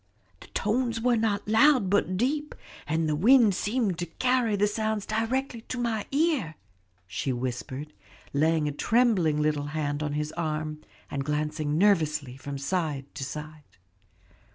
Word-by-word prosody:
The - - -13
tones 230 +1 0
were 245 +1 +3
not 220 -3 0
loud 225 0 +5
but 185 -1 +1
deep, 295 +7 -1 0.3
and 160 +1 0
the 155 - +1
wind 225 - +6
seemed 205 -2 -1
to 175 - -2
carry 250 +3 +1
the 205 +1 +3
sounds 215 0 -1
directly 230 +3 -1
to 255 - -4
my 230 -3 -1
ear," 280 - +1 0.5
she 100 +8 -3
whispered, 130 +4 -4 0.4
laying 155 +1 +2
a - - 0
trembling 185 - +2
little 150 -1 0
hand 145 -1 -1
on 150 -1 -2
his 150 +1 -2
arm, 155 -2 -3 0.3
and 140 -1 -2
glancing 150 +1 -1
nervously 155 -9 +2
from 140 +1 -6
side 145 -2 -2
to 150 - -5
side. 150 0 -8
170 Hz, 150 wpm, -27 LUFS, 150-225 Hz, 0.5 s, wind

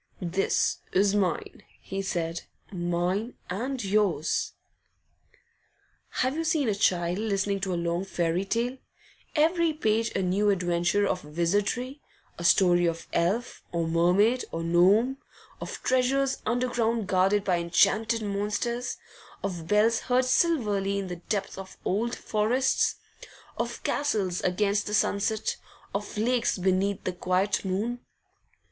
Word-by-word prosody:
'This 185 +2 0
is 195 +1 +3
mine,' 185 -6 -1 0.2
he 195 0 -4
said, 170 -3 -2 0.3
'mine 180 +5 -1 0.2
and 250 +6 -3
yours.' 195 -5 +1 1.7
Have 260 +2 0
you 325 - -1
seen 315 -4 +1
a 215 - +2
child 180 -2 +1
listening 200 -2 0
to 190 -1 -2
a - - 0
long 170 +1 -1
fairy 175 -1 -1
tale, 235 +6 -1 0.6
every 330 +1 +3
page 225 -5 +1
a 190 - +1
new 195 +3 +2
adventure 180 +1 +1
of 185 -2 -1
wizardry, 205 - 0 0.4
a - - -5
story 175 0 +4
of 165 0 -3
elf, 205 +9 0
or 170 -1 -1
mermaid, 180 +9 +3
or 165 - -3
gnome, 195 +10 +4 0.4
of - - -6
treasures 265 +1 +1
underground 235 -2 0
guarded 190 +2 +2
by 180 -3 +1
enchanted 215 +7 +2
monsters, 210 +4 -2 0.5
of 175 -4 -4
bells 215 +4 +3
heard 250 +1 +1
silverly 210 - +1
in 195 -2 -3
the 180 - -5
depth 195 +2 -3
of 190 0 -10
old 230 +5 0
forests, 235 +5 +1 0.6
of - - -4
castles 205 -11 0
against 200 +3 +1
the 210 - 0
sunset, 205 +1 0 0.4
of 205 +1 -4
lakes 240 +1 +1
beneath 190 +2 0
the 185 - -2
quiet 185 +3 0
moon? 210 +6 -2
200 Hz, 130 wpm, -27 LUFS, 180-230 Hz, 1.7 s, story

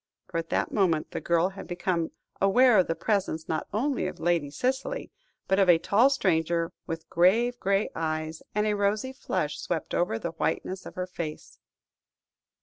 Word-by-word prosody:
For, 165 - -1
at 165 - -6
that - - 0
moment, 175 -7 +1
the - - -4
girl 170 +2 +2
had 195 - -9
become 175 -2 -1 0.3
aware 235 +3 +6
of 185 - +3
the 165 - 0
presence, 190 -7 -1
not 160 -1 -2
only 250 0 0
of - - -7
Lady 170 -4 +1
Cicely, 265 - -2 0.4
but 190 +1 +2
of 190 -2 +4
a 170 - +8
tall 215 +10 +4
stranger 170 - +1
with 165 0 -5
grave 230 +8 +3
grey 200 +2 +1
eyes, 155 0 -3
and 210 0 +2
a 210 - +2
rosy 205 +6 0
flush 150 - -2
swept 165 -3 -3
over 175 -10 +1
the 170 +8 -4
whiteness 185 +3 -2
of - - -11
her 180 - -2
face. 170 -4 -7
180 Hz, 175 wpm, -27 LUFS, 165-210 Hz, 0.4 s, a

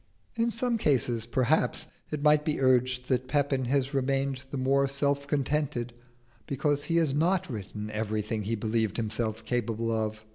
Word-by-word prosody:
In 230 0 +1
some 235 +1 0
cases, 120 - +1
perhaps, 125 0 +1 0.2
it 150 -2 -4
might 150 0 +5
be 150 -1 -1
urged 125 -1 +2
that 130 -1 0
Pepin 140 -2 +1
has 135 +2 0
remained 135 0 0
the 140 - -4
more 135 +1 +2
self 140 +1 0
contented 140 -4 -1 0.5
because 145 +1 0
he 165 - -1
has 160 -5 +3
not 170 +2 +1
written 105 0 -6
everything 110 0 -2
he 110 +3 -1
believed 110 -1 0
himself 110 0 -2
capable 115 -1 -1
of. 110 -1 -2
130 Hz, 155 wpm, -28 LUFS, 115-145 Hz, 0.5 s, might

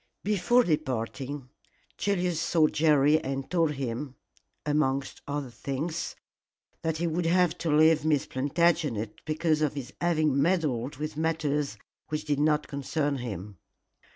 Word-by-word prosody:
Before 210 +5 +3
departing, 135 - -2 0.5
Julius 180 -4 0
saw 165 -1 +3
Jerry 150 -1 +4
and 135 0 -3
told 165 -4 +2
him 135 0 -4 0.5
amongst 140 -2 0
other 140 -3 -3
things 150 +7 -4 0.7
that 160 -1 -1
he 170 - -1
would 165 +1 0
have 180 -1 +3
to 165 - -2
leave 155 +1 +5
Miss 155 -3 +2
Plantagenet 140 -6 0
because 155 0 +1
of 150 -2 +1
his 140 0 -6
having 155 -5 +2
meddled 150 -6 +1
with 150 +2 -5
matters 150 -6 0 0.3
which 155 0 -3
did 145 -2 0
not 150 0 +2
concern 140 +1 -1
him. 105 -6 -6
150 Hz, 130 wpm, -28 LUFS, 135-160 Hz, 0.7 s, leave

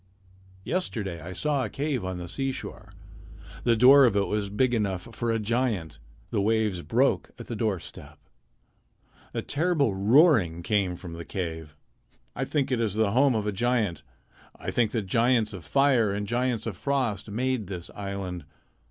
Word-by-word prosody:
Yesterday 105 - -2
I 85 +3 -7
saw 145 +6 0
a 110 - -3
cave 140 -1 -2
on 95 -1 -3
the 90 0 -6
seashore. 135 +7 -5 0.7
The 120 -1 +4
door 135 +4 +8
of 115 - +2
it 100 -1 +2
was 105 -1 -2
big 120 +5 +1
enough 100 -4 -1
for 115 +1 -3
a 115 - +1
giant. 105 - -1 0.3
The - - +1
waves 105 -3 +1
broke - - +1
at - - -9
the 120 - -5
doorstep. 105 -6 -4 1.2
A - - -2
terrible 150 - +1
roaring 105 - +4
came 95 -2 +1
from 85 -1 -9
the 85 0 -7
cave. 80 -5 -5 0.6
I 135 - -2
think 140 -1 -1
it 125 -2 +1
is 105 -3 -1
the 110 -2 +2
home 130 +2 +4
of 105 -1 -1
a 105 - 0
giant. 110 -5 0 0.5
I - - -5
think 120 -3 +2
that 110 -4 -1
giants 115 +1 +2
of 90 -4 -8
fire 120 - +3
and 100 +1 -2
giants 120 0 -1
of 105 -6 -4
frost 125 -7 -1
made 120 0 -1
this 90 -2 -6
island. 100 -5 -5
110 Hz, 170 wpm, -27 LUFS, 95-125 Hz, 1.2 s, door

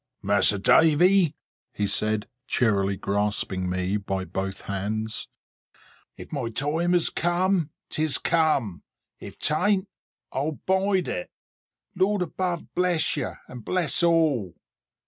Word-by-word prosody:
"Mas'r 100 0 +4
Davy," 165 - +4 0.4
he 105 - -2
said, 105 +1 0 0.2
cheerily 100 -6 +1
grasping 100 -2 -1
me 95 +2 -1
by 95 -2 -3
both 95 +2 -4
hands, 110 +3 -3 0.9
"if - - -11
my 135 -6 -3
time 160 +9 0
is 175 - +3
come, 175 -1 +1 0.2
'tis 155 -2 +1
come. 155 - +1 0.4
If - - -10
'tan't, 190 +5 +1 0.4
I'll 145 +4 -2
bide 190 +2 0
it. 90 - -4 0.6
Lord 195 0 +1
above 175 0 -4
bless 180 -2 +1
you, 145 - -3
and 125 -3 -10
bless 175 - +1
all! 155 - +2
145 Hz, 115 wpm, -25 LUFS, -, 0.9 s, Mas'r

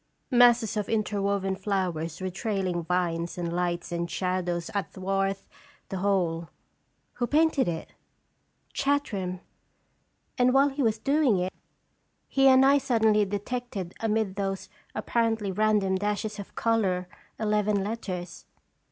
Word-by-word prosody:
" - - -46
Masses 240 -3 +5
of 210 - -2
interwoven 200 -3 0
flowers 185 -5 -2
with 185 -1 -3
trailing 190 -4 -1
vines 170 -1 -1
and 170 -1 -3
lights 175 -1 -2
and 170 0 -2
shadows 180 -2 -2
athwart 195 0 -1 0.5
the 190 - -3
whole. 180 -4 0 0.6
Who 240 - -2
painted 310 - +3
it?" 165 -2 -4 0.8
"Chartram; 205 -11 -1 1.0
and 250 +1 +4
while 275 +1 +5
he 280 +1 -3
was 225 -3 +2
doing 275 -2 +2
it 185 +1 -2 0.7
he 270 0 +4
and 260 0 +7
I 280 +1 +6
suddenly 220 -5 +3
detected 205 -2 -4
amid 220 -3 0
those 195 -1 -3 0.3
apparently 225 -4 0
random 205 -1 +2
dashes 210 +1 -2
of 200 - -9
color 195 -6 +1 0.3
eleven 210 -2 +1
letters. 185 -5 -5
200 Hz, 125 wpm, -27 LUFS, 185-225 Hz, 1.0 s, and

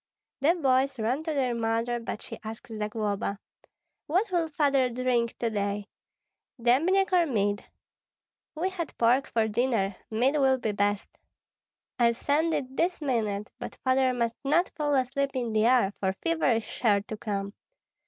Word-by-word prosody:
The 305 +6 +3
boys 265 -4 +2
ran 240 +6 0
to 320 - -1
their 255 -3 +1
mother; 230 +1 0
but 230 -2 -6
she - - -8
asked 220 +1 -8
Zagloba, 210 -2 -2 0.7
"What 375 +7 +1
will 340 -2 +1
Father 280 -4 +2
drink 245 -1 0
to 230 -1 -1
day, 205 0 -2 0.7
dembniak 335 +12 +3
or 350 -2 +4
mead?" 205 -5 0 0.9
"We 360 +5 -1
had 345 -4 -5
pork 245 +4 +3
for 225 -1 +1
dinner; 220 -3 0
mead 250 +7 +2
will 265 -2 +4
be 225 -4 -1
best." 205 0 0 0.9
"I'll 235 -1 +4
send 300 +7 +1
it 260 -1 -4
this 350 +1 +1
minute; 220 -8 -1
but - - -6
Father 260 0 +3
must 235 -2 -1
not 325 +6 +2
fall 295 -3 0
asleep 275 +1 0
in 240 -3 -2
the 215 0 +3
air, 240 -6 +3
for 190 -1 0
fever 325 - 0
is 225 0 0
sure 210 -4 +1
to 215 +2 -7
come." 200 -2 -4
245 Hz, 160 wpm, -28 LUFS, 220-280 Hz, 0.9 s, or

